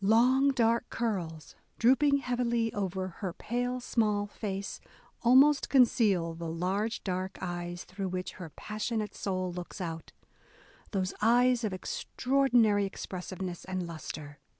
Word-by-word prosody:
Long 250 +6 +5
dark 235 -3 +2
curls, 175 -9 -3 0.2
drooping 280 +4 +4
heavily 240 -2 0
over 190 -2 -2
her 185 -4 -3
pale 245 +2 -2
small 210 -4 +1
face, 200 -1 -5 0.4
almost 270 +4 +5
conceal 210 -10 +4
the 165 0 -5
large 190 +7 -1
dark 185 0 -3
eyes 175 -1 -4
through 190 +1 -5
which 185 0 -3
her 165 - -6
passion 215 +7 -3
ate 210 - -8
soul 185 -2 -2
looks 180 +3 -7
out, 165 -3 -5 0.4
— - - -27
those 190 -3 -1
eyes 245 +2 +4
of 215 - 0
extraordinary 235 +1 +2
expressiveness 185 -1 -6
and 185 -1 -3
lustre. 155 -3 -7
205 Hz, 130 wpm, -30 LUFS, 180-240 Hz, 0.4 s, Long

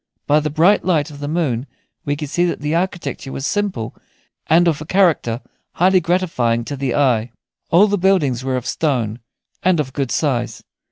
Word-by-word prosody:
By 150 +1 +4
the 150 0 -2
bright 170 +7 +3
light 160 -4 +1
of 145 - -11
the 145 - -4
moon 145 -6 -1 0.4
we 145 -1 0
could 145 -1 -6
see 175 - +1
that 175 - -2
the 150 +1 -1
architecture 170 -5 -2
was 135 - -4
simple, 185 - -2 0.5
and 170 +2 +4
of 155 -3 +1
a - - -6
character 165 -12 +2 0.3
highly 185 +2 +4
gratifying 160 -10 0
to 145 - -4
the 135 -2 -2
eye. 125 -5 +2 0.4
All 180 +5 +6
the 205 -1 0
buildings 155 -10 +2
were 130 -1 -1
of 125 - -5
stone, 125 -8 -1 0.4
and 185 -2 +2
of 130 -3 -2
good 135 -3 -2
size. 125 -5 -1
150 Hz, 185 wpm, -19 LUFS, 130-175 Hz, 0.5 s, All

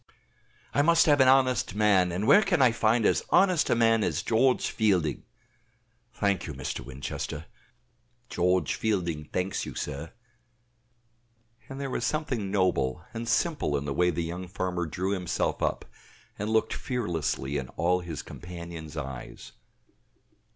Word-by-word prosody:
"I 145 - +3
must 165 +2 +5
have 145 -2 +4
an 130 - +6
honest 130 -6 +3
man, 100 -4 +3
and 95 +5 -2
where 205 - +7
can 195 -5 +1
I 130 -3 +6
find 115 0 +2
as - - +2
honest 185 -4 +4
a - - +3
man 115 -1 +3
as - - -1
George 125 +3 +2
Fielding?" 95 -9 +1 0.9
("Thank 100 -4 -1
you, 75 - -6
Mr. 65 0 -4
Winchester; 70 +4 -6 0.8
George 90 +1 +1
Fielding 85 -8 -1
thanks 90 +5 -2
you, - - -7
sir.") 75 +2 -5 1.6
And 135 0 -7
there 135 -1 -4
was - - -2
something 135 -10 -1
noble 90 -6 0
and 115 0 -4
simple 145 - +1
in 70 - -4
the 70 - -2
way 90 +5 +2
the 85 0 -1
young 90 +3 -5
farmer 90 -1 -3
drew 95 +5 -2
himself 90 -3 -1
up, - - -1 0.5
and 105 +1 -2
looked 110 0 +1
fearlessly 80 - -2
in 65 - -7
all 90 +2 +2
his 85 -3 -6
companions' 85 -3 -9
eyes. 65 -5 -7
95 Hz, 150 wpm, -27 LUFS, 80-115 Hz, 1.6 s, where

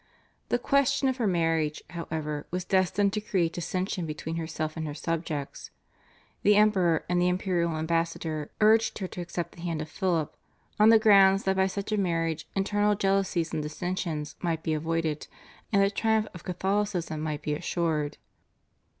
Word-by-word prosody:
The - - +2
question 280 +1 +2
of 260 - -2
her 230 -4 +1
marriage, 165 -4 0
however, 155 -3 -4
was 180 0 -3
destined 195 +1 +2
to 210 - -1
create 175 -5 0
dissension 180 0 -2
between 155 +2 -4
herself 155 -1 -3
and 160 -1 -3
her 145 - -5
subjects. 160 -3 -4 0.7
The 210 +1 +5
Emperor 190 -6 +3
and 175 0 +1
the 180 - +3
imperial 180 -2 0
ambassador 160 -1 -1
urged 220 +1 +4
her 190 - -3
to 180 - -7
accept 170 -1 -4
the 170 - -13
hand 170 -2 -2
of 155 - -4
Philip, 170 -4 -1 0.4
on 210 +1 +7
the 225 - +8
ground 195 -3 +6
that 190 0 0
by 190 0 +3
such 200 +2 -4
a 215 - +1
marriage 165 -4 -1
internal 205 +1 +2
jealousies 195 -4 0
and 155 - -1
dissensions 155 -1 -3
might 165 -2 -1
be 160 - 0
avoided, 160 -1 -1 0.4
and 200 -2 +4
the 200 - +2
triumph 220 +1 +1
of 180 - -10
Catholicism 185 -3 -1
might 150 -1 -3
be 150 - -1
assured. 155 -2 -1
175 Hz, 165 wpm, -28 LUFS, 160-195 Hz, 0.7 s, the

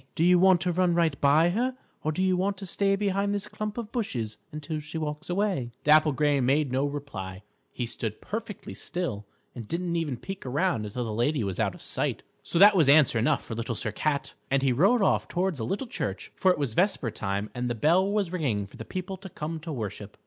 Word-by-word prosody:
Do 165 - +1
you 180 +1 +6
want 185 -1 +5
to 180 -1 +1
run 175 0 +2
right 165 -5 +1
by 150 +4 +5
her, 250 +6 -1 0.3
or 155 - +1
do 185 +4 -1
you 185 -1 +3
want 195 +2 0
to 195 - -6
stay 195 +2 +2
behind 200 0 0
this 200 - -3
clump 215 0 -5
of 230 -2 -5
bushes 120 - -3
until 150 +1 -4
she 150 +2 -5
walks 150 0 -4
away?" 180 - -1
Dapple 155 +1 +6
Gray 145 0 +2
made 135 +2 +2
no 135 +2 +1
reply. 105 -10 -6 0.3
He 120 - -3
stood 115 -2 -4
perfectly 215 -1 -6
still 125 - -3 0.3
and 115 -4 -8
didn't 170 +3 -2
even 155 -7 -1
peek 195 +9 -7
around 130 - 0
until 120 +4 -4
the 110 - -3
lady 120 +4 +1
was 95 -3 -3
out - - 0
of - - -11
sight. - - -2 0.2
So - - -3
that 200 +3 +8
was 160 -7 +4
answer 140 -5 +6
enough 115 - +1
for - - -6
Little 115 +1 -3
Sir 110 - -3
Cat, 140 +5 -1 0.2
and 135 0 +2
he 135 -2 +3
rode 195 - +4
off - - +2
towards 180 -4 -1
a - - -2
little 200 - -2
church, 245 - -4
for 190 - +3
it 180 - +3
was 140 -6 -2
vesper 175 - +1
time 100 0 -3
and 125 0 -2
the 120 - -1
bell 175 - +3
was 205 -4 0
ringing 130 - -1
for 100 - -15
the - - -7
people 190 +1 -5
to 190 - -10
come 160 0 -5
to 160 +1 -7
worship. 105 -5 -6
155 Hz, 230 wpm, -27 LUFS, 125-190 Hz, 0.3 s, that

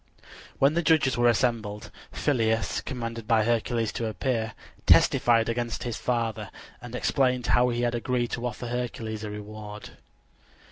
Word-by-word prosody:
When 140 +2 +4
the 170 - +1
judges 155 -5 +3
were 120 0 +4
assembled, 110 -3 -1 0.2
Phyleus, 115 -5 0
commanded 115 -3 -5
by 115 -2 +4
Hercules 115 -1 0
to 115 - -3
appear, 110 -1 -2 0.3
testified 115 -2 +5
against 120 0 -2
his 120 -2 -3
father, 115 -4 -2 0.3
and 120 0 -8
explained 125 -1 +1
how 125 +1 +3
he 120 0 -1
had 120 0 +1
agreed 120 0 -1
to 125 0 -2
offer 120 +1 -6
Hercules 115 -3 -4
a 105 - -4
reward. 105 0 -8
115 Hz, 145 wpm, -27 LUFS, 110-125 Hz, 0.3 s, testified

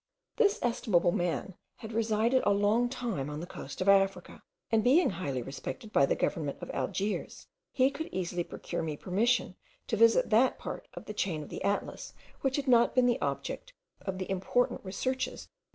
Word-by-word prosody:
This 420 -3 +4
estimable 215 -8 +2
man 175 +2 -1 0.2
had 220 0 -9
resided 225 +3 +2
a - - +3
long 210 +4 +2
time 230 - -3
on 150 0 -5
the 170 - -5
coast 140 -3 -8
of 185 - -1
Africa; 195 0 +2 0.3
and 225 -1 +3
being 280 - +5
highly 140 -9 -3
respected 140 - -7
by 140 - +5
the - - +1
government 145 -4 -1
of - - -6
Algiers, 195 +10 -3 0.3
he 265 +1 +3
could 320 +2 -5
easily 180 -1 -2
procure - - -5
me 155 -2 -3
permission 210 +3 +1 0.3
to - - -1
visit 230 +1 +4
that 240 +4 +4
part - - -6
of - - -8
the 210 - -6
chain 170 -7 -1
of - - -11
the - - -6
Atlas 200 +1 -2 0.3
which 265 -1 +1
had 285 -1 -2
not 240 -2 +5
been 255 -1 +5
the 240 -1 +2
object - - -3 0.3
of 190 -2 -4
the 185 -1 -4
important 195 +6 +1
researches 255 +7 -2
of - - -20
M. - - -57
210 Hz, 190 wpm, -30 LUFS, 180-245 Hz, 0.3 s, being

